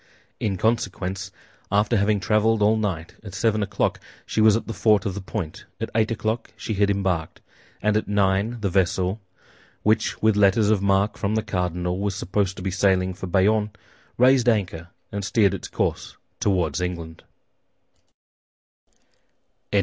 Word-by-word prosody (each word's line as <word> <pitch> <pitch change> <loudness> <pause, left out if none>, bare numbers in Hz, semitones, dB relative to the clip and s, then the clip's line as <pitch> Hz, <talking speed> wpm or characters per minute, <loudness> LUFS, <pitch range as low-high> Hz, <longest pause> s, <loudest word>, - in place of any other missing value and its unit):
In 100 -3 -1
consequence, 95 -3 -1 0.4
after 105 +3 +2
having 105 0 +2
traveled 105 +3 +2
all 105 +2 +4
night, 95 -7 -3
at 100 -3 -9
seven 110 +1 +1
o'clock 100 - -1 0.3
she 110 - 0
was 110 -1 +6
at 115 - -2
the 115 - -5
fort 105 -4 +3
of 100 - -1
the 100 - -5
Point; 95 -5 -5
at 115 - -4
eight 110 0 +2
o'clock 115 0 -2
she 110 - -4
had 100 0 +2
embarked; 95 -5 -1 0.4
and 105 0 +2
at 110 - 0
nine, 100 +3 +1
the 100 - 0
vessel, 95 +2 +1 0.6
which 110 +1 +1
with 110 -1 +3
letters 105 +1 +4
of 105 -3 +2
marque 100 +1 +2
from 105 +1 0
the 110 - 0
cardinal 90 0 -2
was 100 -1 -1
supposed 95 +1 -1
to - - -7
be 95 - -1
sailing 95 -1 +2
for 95 +1 -7
Bayonne, 105 +4 +2 0.5
raised 125 -1 +5
anchor, 90 -7 -1 0.2
and 100 0 -4
steered 100 -1 +2
its - - -5
course - - -2 0.2
toward 90 -6 0
England. 85 -2 -5
100 Hz, 155 wpm, -24 LUFS, 95-110 Hz, 0.6 s, was